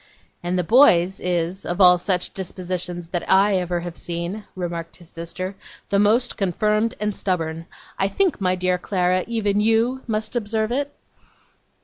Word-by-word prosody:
'And 175 Hz, +1 st, -1 dB
the 180 Hz, -, +1 dB
boy's 190 Hz, -, +5 dB
is, 180 Hz, +1 st, -1 dB
of 175 Hz, -, -4 dB
all 180 Hz, -2 st, +7 dB
such 180 Hz, -1 st, -1 dB
dispositions 180 Hz, -2 st, -4 dB
that 175 Hz, -1 st, -2 dB
ever 190 Hz, -3 st, +3 dB
I -, -, -8 dB
have 175 Hz, -1 st, -6 dB
seen,' 175 Hz, +6 st, -4 dB
remarked 170 Hz, -2 st, -5 dB
his 175 Hz, -, -15 dB
sister, 185 Hz, +3 st, -5 dB, 0.3 s
'the 200 Hz, -, +2 dB
most 225 Hz, +5 st, +2 dB
confirmed 210 Hz, +4 st, 0 dB
and 210 Hz, 0 st, -1 dB
stubborn. 165 Hz, -3 st, -2 dB, 0.3 s
I 195 Hz, -, +3 dB
think, 365 Hz, -, 0 dB
my 185 Hz, -1 st, +2 dB
dear 180 Hz, 0 st, 0 dB
Clara, 180 Hz, -1 st, +1 dB
even 210 Hz, -3 st, 0 dB
you 225 Hz, +4 st, +2 dB
must 215 Hz, 0 st, -2 dB
observe 220 Hz, -1 st, -1 dB
it? 285 Hz, +3 st, -1 dB
185 Hz, 155 wpm, -22 LUFS, 175-215 Hz, 0.3 s, all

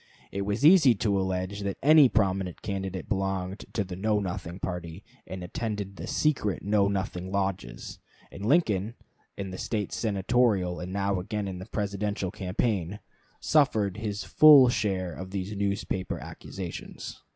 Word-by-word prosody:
It 100 Hz, -, -3 dB
was 105 Hz, +7 st, 0 dB
easy 155 Hz, -8 st, +7 dB
to 100 Hz, -1 st, +1 dB
allege 95 Hz, +1 st, -2 dB
that 100 Hz, -1 st, -3 dB
any 150 Hz, -2 st, +7 dB
prominent 95 Hz, -5 st, 0 dB
candidate 95 Hz, -2 st, -4 dB
belonged 95 Hz, -1 st, -2 dB
to 105 Hz, -, 0 dB
the 90 Hz, -1 st, -7 dB
Know 105 Hz, +3 st, +1 dB
Nothing 90 Hz, -2 st, -5 dB
party, 90 Hz, +1 st, -5 dB, 0.2 s
and 95 Hz, -1 st, -6 dB
attended 100 Hz, +1 st, -4 dB
the -, -, -6 dB
secret 130 Hz, -, 0 dB
Know 100 Hz, 0 st, +3 dB
Nothing 95 Hz, -2 st, -3 dB
lodges; 95 Hz, -10 st, -3 dB, 0.3 s
and 100 Hz, -, -9 dB
Lincoln, 110 Hz, -, +2 dB, 0.4 s
in 95 Hz, -1 st, -5 dB
the 95 Hz, -, -5 dB
late 105 Hz, -3 st, -1 dB
Senatorial, 100 Hz, -3 st, +1 dB
and 90 Hz, +1 st, -6 dB
now 100 Hz, -1 st, 0 dB
again 105 Hz, +2 st, -3 dB
in 95 Hz, -2 st, -5 dB
the 95 Hz, -, -8 dB
Presidential, 100 Hz, -3 st, -2 dB
campaign, 95 Hz, 0 st, -2 dB, 0.4 s
suffered 110 Hz, -, +2 dB
his 105 Hz, -3 st, -3 dB
full 140 Hz, +4 st, +8 dB
share 95 Hz, -7 st, -1 dB
of 95 Hz, +3 st, -7 dB
these 100 Hz, +1 st, -4 dB
newspaper 100 Hz, -2 st, -2 dB
accusations. 90 Hz, -4 st, -8 dB
100 Hz, 150 wpm, -27 LUFS, 95-105 Hz, 0.4 s, full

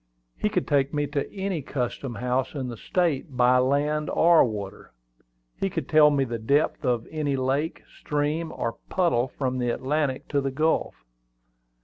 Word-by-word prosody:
He -, -, 0 dB
could -, -, -1 dB
take 140 Hz, 0 st, +1 dB
me 145 Hz, 0 st, +1 dB
to 140 Hz, -1 st, -3 dB
any 190 Hz, -4 st, -3 dB
custom 125 Hz, -1 st, -4 dB
house 125 Hz, +5 st, -1 dB
in 130 Hz, -3 st, -3 dB
the 120 Hz, -, -6 dB
State 150 Hz, -, -1 dB
by 125 Hz, 0 st, +5 dB
land 145 Hz, +4 st, +1 dB
or 170 Hz, 0 st, +5 dB
water. 105 Hz, -4 st, -5 dB, 0.7 s
He 195 Hz, -, 0 dB
could -, -, -4 dB
tell 155 Hz, -2 st, +6 dB
me 140 Hz, -2 st, +2 dB
the 120 Hz, -3 st, -4 dB
depth 140 Hz, +9 st, +1 dB
of 120 Hz, -3 st, 0 dB
any 150 Hz, -3 st, -1 dB
lake, 135 Hz, +4 st, -1 dB, 0.2 s
stream, 150 Hz, +2 st, -1 dB
or 115 Hz, -, -4 dB
puddle 165 Hz, -10 st, +2 dB
from 130 Hz, -1 st, -3 dB
the 120 Hz, -1 st, 0 dB
Atlantic 135 Hz, +2 st, -1 dB
to 140 Hz, -1 st, +1 dB
the 135 Hz, -, -1 dB
Gulf. 155 Hz, +4 st, 0 dB
140 Hz, 165 wpm, -25 LUFS, 125-150 Hz, 0.7 s, tell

